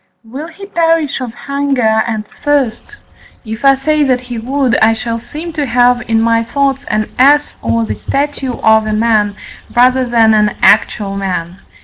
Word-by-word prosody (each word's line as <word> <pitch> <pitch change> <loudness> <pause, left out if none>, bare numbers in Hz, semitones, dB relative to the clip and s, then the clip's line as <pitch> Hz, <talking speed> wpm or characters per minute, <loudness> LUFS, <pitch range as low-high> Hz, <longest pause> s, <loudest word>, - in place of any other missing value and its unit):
Will 265 +8 -8
he 365 +4 -11
perish 330 -7 0
of 250 -2 -5
hunger 260 -4 0
and 220 -2 -3
thirst? 290 - -2 0.5
If 220 +2 -7
I 275 0 +6
say 305 +3 0
that 255 -3 +1
he 245 -2 -6
would, 260 +1 0
I 220 +1 +5
shall 230 0 -4
seem 315 +7 -8
to 295 -3 -2
have 245 0 +3
in 225 -1 +2
my 230 0 +2
thoughts 275 +3 -1
an 215 0 -2
ass 290 +3 +4
or 115 0 0
the 105 - -3
statue 275 - -3
of 220 -1 +2
a 215 - -1
man 215 -2 +1 0.4
rather 255 +2 +4
than 230 -2 +3
an 210 -1 +2
actual 205 -1 +2
man. 185 -2 -4
245 Hz, 170 wpm, -14 LUFS, 220-280 Hz, 0.5 s, I